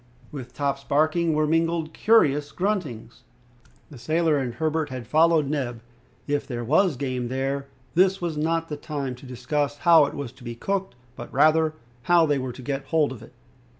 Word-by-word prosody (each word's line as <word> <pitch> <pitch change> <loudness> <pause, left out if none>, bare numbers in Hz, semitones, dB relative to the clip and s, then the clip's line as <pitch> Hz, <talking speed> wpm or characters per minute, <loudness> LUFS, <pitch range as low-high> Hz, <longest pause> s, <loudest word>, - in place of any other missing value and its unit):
With 125 -4 -8
Top's 140 -1 -1
barking 155 +3 +1
were 155 0 +2
mingled 165 0 0
curious 150 -10 +3
gruntings. 150 - -3 0.7
The 135 - -11
sailor 155 +4 +1
and 125 -3 -3
Herbert 155 +2 -1
had 130 -2 -6
followed 160 +4 +4
Neb. 125 -6 -3 0.4
If 145 0 -1
there 120 -3 -4
was 155 - +3
game 130 -2 -2
there 135 +2 -2 0.3
this 190 +2 +3
was 170 -3 -3
not 165 +2 0
the 150 - -5
time 145 -4 -4
to 125 +2 -12
discuss 140 +4 -2
how 165 -2 +6
it - - -7
was 140 -5 -5
to 130 0 -18
be 120 -1 -6
cooked, 195 +2 -3 0.2
but 120 - -9
rather, 155 +2 +3 0.3
how 175 -2 +6
they 145 -3 +1
were 130 -1 -4
to 130 - -11
get 135 +1 -3
hold 155 -1 +1
of 125 -4 -8
it. 115 - -14
145 Hz, 185 wpm, -25 LUFS, 130-160 Hz, 0.7 s, how